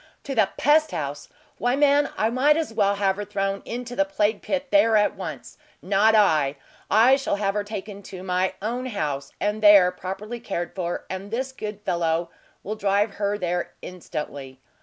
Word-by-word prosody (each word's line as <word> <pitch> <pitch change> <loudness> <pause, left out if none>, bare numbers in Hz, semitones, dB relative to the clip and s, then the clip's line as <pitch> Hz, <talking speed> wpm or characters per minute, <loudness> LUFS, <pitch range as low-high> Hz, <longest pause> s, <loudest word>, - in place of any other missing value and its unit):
"To 275 - -4
the 220 -6 +3
pest 310 +3 +4
house! 145 -4 -5 0.3
Why 245 +2 +1
man, 285 0 +3
I 220 +1 +1
might 285 +5 +3
as 315 -8 -2
well 200 -2 +2
have 195 -1 +1
her 205 - -3
thrown 195 -1 -2
into 245 +1 -5
the 290 - +3
plague 220 -8 0
pit 280 -1 -3
there, 230 -8 +5
at 210 0 +2
once! - - -8 0.2
Not 205 +3 +3
I! 155 -9 +3 0.3
I 240 +5 +6
shall 270 -6 -1
have 200 -1 -1
her 210 0 -1
taken 205 -1 -7
to 185 -1 -8
my 185 0 0
own 245 +4 -2
house, 145 - -3
and 210 +2 -1
there 200 -4 +7
properly 195 +6 -6
cared 175 -7 -4
for, 175 -2 -4
and 190 +2 -6
this 260 +4 -3
good 210 -5 -7
fellow 170 -3 -1 0.3
will 210 - -3
drive 205 0 +1
her 205 0 +1
there 175 -2 -2
instantly." 140 -6 -7
205 Hz, 180 wpm, -24 LUFS, 185-235 Hz, 0.3 s, there